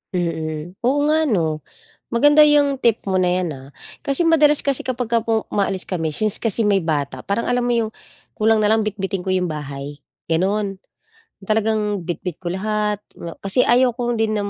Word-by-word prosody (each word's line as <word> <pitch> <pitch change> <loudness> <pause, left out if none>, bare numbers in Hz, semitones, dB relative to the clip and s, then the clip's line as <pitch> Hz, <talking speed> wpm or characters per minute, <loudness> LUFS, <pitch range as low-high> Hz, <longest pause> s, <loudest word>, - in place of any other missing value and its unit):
Mm, 160 -2 -3 0.2
oo 275 +3 +2
nga 310 +1 +2
'no? 160 - 0 0.5
Maganda 290 +6 +5
'yung 295 -2 +4
tip 230 -2 +3
mo 190 -1 +1
na 180 - +2
'yan 180 -1 -1
ah. 135 0 -12 0.3
Kasi 280 +5 0
madalas 300 -3 +5
kasi 275 -2 0
kapagka 235 -2 -1
po 225 -1 -1
umaalis 195 -2 -1
kami 165 -4 -2
since 210 +7 -1
kasi 225 -1 +1
may 200 -2 +3
bata, 140 -5 -2
parang 200 +4 -2
alam 245 0 +1
mo 245 - 0
'yung 230 -2 +1 0.4
kulang 220 +1 +3
nalang 215 +1 +3
bitbitin 195 -3 -3
ko 190 - -3
'yung 185 -1 +1
bahay, 145 -2 -6 0.2
ganun. 195 +3 -1 0.6
Talagang 215 -1 0
bitbit 175 +1 -5
ko 175 - -3
lahat 210 +3 -1 0.2
nga 170 -1 -9
kasi 195 +6 +1
ayaw 250 0 +3
kong 240 -1 -2
din 220 -1 +1
nam 205 -1 -1
210 Hz, 180 wpm, -21 LUFS, 180-235 Hz, 0.6 s, Maganda